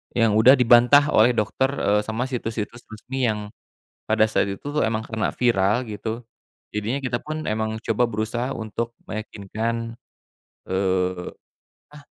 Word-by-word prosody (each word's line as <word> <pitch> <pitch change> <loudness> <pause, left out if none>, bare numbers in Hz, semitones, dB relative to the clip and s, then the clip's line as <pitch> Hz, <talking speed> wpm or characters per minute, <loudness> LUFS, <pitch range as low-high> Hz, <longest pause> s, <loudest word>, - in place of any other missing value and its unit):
yang 115 -2 +3
udah 125 +4 +8
dibantah 125 +4 +5
oleh 115 +3 +5
dokter, 110 +4 +1
eee, 105 -5 +2
sama 110 +2 -2
situs-situs 115 -2 -4
resmi 125 +5 -4
yang 105 -1 -2 0.6
pada 110 - +4
saat 100 - +1
itu, 100 - -6
tuh, 145 +1 -1
emang 110 0 -2
karena 110 -1 -1
viral 115 0 +2
gitu, 110 +2 -5 0.5
jadinya 105 +6 -2
kita 125 -2 -1
pun 155 0 -5
emang 110 0 -1
coba 115 +2 +1
berusaha 115 +3 -2
untuk 115 +1 -4
meyakinkan, 110 +2 -4 0.7
eee, 95 -1 0 0.7
ah, 150 - -12
110 Hz, 140 wpm, -23 LUFS, 105-120 Hz, 0.7 s, udah